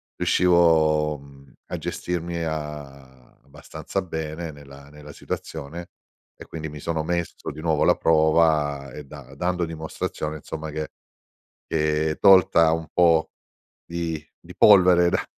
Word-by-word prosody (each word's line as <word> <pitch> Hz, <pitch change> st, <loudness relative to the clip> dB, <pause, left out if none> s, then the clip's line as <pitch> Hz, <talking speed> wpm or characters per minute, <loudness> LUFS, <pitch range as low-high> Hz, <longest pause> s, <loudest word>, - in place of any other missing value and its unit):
riuscivo, 80 Hz, -4 st, +3 dB
mhmm, 70 Hz, -1 st, -17 dB, 0.2 s
a -, -, -2 dB
gestirmi 85 Hz, -1 st, -4 dB
a 70 Hz, -5 st, -7 dB
abbastanza 70 Hz, +7 st, -6 dB
bene 80 Hz, -1 st, -5 dB
nella 70 Hz, -1 st, -14 dB
nella 75 Hz, 0 st, -12 dB
situazione, 80 Hz, +3 st, -7 dB, 0.5 s
e -, -, -12 dB
quindi 80 Hz, -1 st, -7 dB
mi 75 Hz, 0 st, -9 dB
sono 80 Hz, +1 st, -2 dB
messo 85 Hz, +1 st, -3 dB
di 75 Hz, -, -9 dB
nuovo 80 Hz, -2 st, 0 dB
alla -, -, +4 dB
prova 80 Hz, -3 st, +2 dB
e 75 Hz, -, -8 dB
da 70 Hz, -2 st, -12 dB
dando 90 Hz, +3 st, -1 dB
dimostrazione, 80 Hz, -1 st, -5 dB
insomma, 80 Hz, +1 st, -7 dB
che 75 Hz, 0 st, -5 dB, 0.8 s
che 75 Hz, 0 st, 0 dB
tolta 85 Hz, -4 st, +5 dB
un 80 Hz, 0 st, -2 dB
po' 85 Hz, -2 st, +3 dB, 0.5 s
di 85 Hz, -2 st, -4 dB, 0.2 s
di -, -, -14 dB
polvere 90 Hz, -4 st, +6 dB
da -, -, 0 dB
80 Hz, 130 wpm, -23 LUFS, 75-85 Hz, 0.8 s, polvere